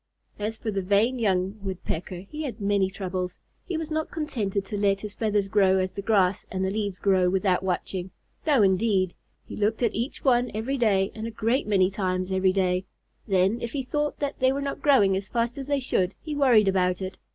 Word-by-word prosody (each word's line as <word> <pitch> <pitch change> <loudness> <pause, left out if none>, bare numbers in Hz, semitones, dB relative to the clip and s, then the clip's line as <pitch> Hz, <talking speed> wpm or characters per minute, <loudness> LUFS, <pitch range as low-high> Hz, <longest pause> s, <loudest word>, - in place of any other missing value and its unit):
As 215 +2 -3
for 220 -1 -3
the 195 -1 -1
vain 205 +7 +2
young 195 -1 0
Woodpecker, 185 -2 -4
he 300 +11 -8
had 255 -7 -5
many 200 -2 +1
troubles. 185 -2 -4 0.3
He 355 - -2
was 320 -1 -5
not 315 0 -1
contented 210 - -2
to 205 - -5
let 200 -1 +1
his 210 -1 -5
feathers 210 -3 0
grow 195 -2 +3
as 185 0 0
the 200 - -5
grass 195 -3 +2
and 190 0 -1
the 190 - -1
leaves 205 -2 -2
grow, 185 -2 +3
without 190 0 +1
watching. 185 0 -3 0.4
No 275 -8 +5
indeed! 190 -1 +2 0.3
He - - -8
looked 215 +3 0
at 235 - +2
each 235 +5 -4
one 245 -2 +3
every 255 +5 -2
day 195 -4 +2
and 220 0 -5
a - - -3
great 230 +4 0
many 190 -2 +3
times 185 -2 -2
every 190 0 +3
day. 185 -1 0 0.4
Then, 195 +3 +2
if 235 - -4
he 275 -2 -2
thought 295 +3 -2 0.2
they 260 0 +4
were 275 - -1
not 280 0 -4
growing 210 -10 +4
as 190 0 -4
fast 235 +2 -1
as 270 - -6
they 285 -1 +1
should, 190 -7 0
he 310 - -6
worried 245 -8 +5
about 185 -1 +2
it. 185 0 -6
200 Hz, 210 wpm, -26 LUFS, 190-235 Hz, 0.4 s, No